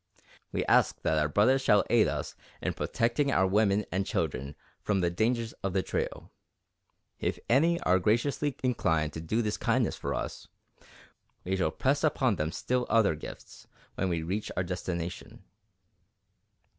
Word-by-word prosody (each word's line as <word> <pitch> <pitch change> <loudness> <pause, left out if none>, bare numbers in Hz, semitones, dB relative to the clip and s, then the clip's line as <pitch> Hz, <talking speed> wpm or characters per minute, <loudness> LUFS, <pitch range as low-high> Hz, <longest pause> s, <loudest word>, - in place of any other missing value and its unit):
We - - -1
ask - - +3
that 80 0 +2
our 75 - +2
brothers 120 - +3
shall 105 -6 +4
aid 115 -2 +5
us - - -3 0.3
in - - -2
protecting 120 +5 0
our 95 - +3
women 100 +1 +2
and 95 +2 0
children 70 -6 -2 0.3
from 100 -2 0
the 85 -1 +1
dangers 115 +4 0
of 95 -2 -2
the 95 -1 +1
trail. - - -4 0.9
If - - -1
any 165 +8 +3
are 90 +1 +3
graciously 130 +7 +1
inclined 80 - +1
to 80 - -5
do 110 +9 0
this 105 -1 -1
kindness - - +1
for - - -3
us, - - -5 1.0
we 95 +1 -1
shall 90 -4 +1
press 135 - 0
upon 130 - +2
them 75 +1 -1
still 125 +5 -1
other 110 -5 +4
gifts 75 - -10 0.3
when 95 - -1
we 85 -2 -1
reach 100 +6 -3
our 90 - +2
destination." 90 -1 -5
100 Hz, 155 wpm, -29 LUFS, 85-120 Hz, 1.0 s, aid